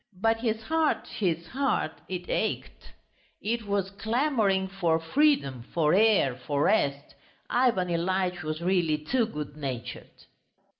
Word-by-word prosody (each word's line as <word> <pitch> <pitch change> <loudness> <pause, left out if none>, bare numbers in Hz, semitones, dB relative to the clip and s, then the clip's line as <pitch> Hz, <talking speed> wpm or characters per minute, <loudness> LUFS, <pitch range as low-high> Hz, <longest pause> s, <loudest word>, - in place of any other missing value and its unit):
But 225 +2 +2
his 225 -1 -1
heart, 320 +3 +1
his 170 -5 -1
heart... 265 - 0 0.2
it 180 -1 -4
ached! - - -3 0.5
It 225 0 -2
was 200 -1 -1
clamouring 220 -3 +1
for 175 -4 0
freedom, 165 - +2
for 155 -3 +3
air, 205 - +4
for 140 +3 -1
rest. 140 -9 +1 0.4
Ivan 240 -8 +2
Ilyitch 180 +1 0
was 155 +1 -4
really 175 -4 +2
too 225 +10 0
good 150 -8 -6
natured. 125 -5 -7
190 Hz, 130 wpm, -27 LUFS, 155-225 Hz, 0.5 s, air